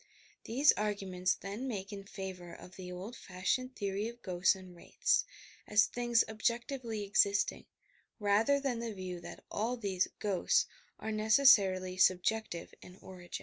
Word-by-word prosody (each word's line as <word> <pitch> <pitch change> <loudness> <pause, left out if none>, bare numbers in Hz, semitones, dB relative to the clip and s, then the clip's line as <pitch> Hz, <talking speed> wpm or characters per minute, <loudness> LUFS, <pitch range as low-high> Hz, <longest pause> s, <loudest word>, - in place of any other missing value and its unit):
These 275 +6 +5
arguments 195 -3 -1
then 205 +7 -6
make 200 -4 -5
in 195 -1 -7
favour 185 -3 -7
of 180 - -13
the 180 -1 -8
old 190 +7 -7
fashioned 235 +9 -2
theory 200 +1 -2
of 235 +1 -10
ghosts 180 0 +2
and 185 -2 -12
wraiths, 170 - +1 0.4
as 210 0 +5
things 240 -1 +2
objectively 235 0 -2
existing, 200 0 +2 0.5
rather 215 +7 +3
than 270 -4 -2
the 230 -2 -4
view 185 -2 -5
that 170 - -10
all 230 +4 -1
these 195 -5 0
"ghosts" 200 -4 +2 0.3
are 220 - -4
necessarily 215 -5 +4
subjective 185 0 +1
in 180 - -13
or^in. 180 -2 -12
205 Hz, 145 wpm, -33 LUFS, 185-230 Hz, 0.5 s, These